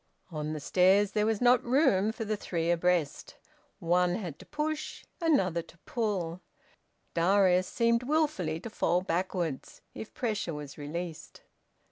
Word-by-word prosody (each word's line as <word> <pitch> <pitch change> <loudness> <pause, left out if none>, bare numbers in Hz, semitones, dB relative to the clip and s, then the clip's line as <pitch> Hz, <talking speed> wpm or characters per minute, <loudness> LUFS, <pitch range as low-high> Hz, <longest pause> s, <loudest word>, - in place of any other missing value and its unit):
On 155 -1 -3
the 155 - -4
stairs 190 +6 +3
there 210 0 +1
was 220 -1 0
not 245 0 +5
room 235 -6 +3
for 225 0 -5
the 215 0 -1
three 170 -4 -2
abreast. 175 -3 0 0.4
One 175 +1 +2
had 175 -9 -6
to - - -14
push, 305 +1 -4 0.2
another 190 - +2
to 170 - -18
pull: 195 - -2 0.7
Darius 185 +1 +3
seemed 235 +2 +2
wilfully 255 - 0
to 225 - -7
fall 180 -3 +1
backwards 175 -4 -3
if 220 - -8
pressure 210 -9 -2
were 150 -1 -6
released. 160 +3 -7
185 Hz, 140 wpm, -29 LUFS, 170-225 Hz, 0.7 s, not